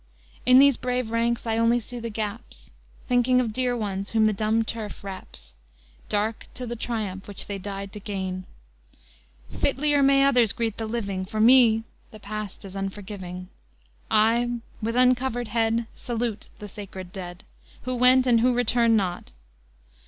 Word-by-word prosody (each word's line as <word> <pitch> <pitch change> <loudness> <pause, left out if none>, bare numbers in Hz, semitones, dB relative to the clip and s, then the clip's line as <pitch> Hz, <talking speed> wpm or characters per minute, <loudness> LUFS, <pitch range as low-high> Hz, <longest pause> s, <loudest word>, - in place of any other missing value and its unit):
In 255 0 +8
these 280 -1 +6
brave 250 -2 -2
ranks 235 +1 0
I 225 0 0
only 230 +1 +3
see 240 +2 -8
the 230 0 -4
gaps, 215 +1 -6 0.4
Thinking 250 0 +3
of 230 -4 -1
dear 250 0 0
ones 200 -3 -3
whom 220 -1 +3
the 215 - +3
dumb 220 +2 +1
turf 220 -3 -6
wraps, 185 - -9 0.6
Dark 215 +2 -1
to 250 - -5
the 240 0 -4
triumph 215 -5 -4
which 205 - -5
they 200 -1 -5
died 195 0 -6
to 210 - -7
gain: 190 -2 -4 1.1
Fitlier 285 +1 +2
may 275 0 +5
others 245 -6 +4
greet 225 -3 -2
the 225 - -3
living, 200 -5 -3
For 215 +3 -5
me 225 -1 +6 0.3
the 215 - -13
past 210 -1 -6
is 195 0 -9
unforgiving; 190 -2 -6 0.6
I 230 +3 +3 0.2
with 230 +2 -2
uncovered 250 -2 +2
head 225 +1 +1
Salute 235 -3 -3
the 210 - -8
sacred 195 -3 -9
dead, 180 -3 -8 0.4
Who 255 - -3
went, 250 +1 +5
and 240 -2 +4
who 250 +2 +3
return 235 -1 +3
not. 185 -4 -2
225 Hz, 160 wpm, -25 LUFS, 200-245 Hz, 1.1 s, In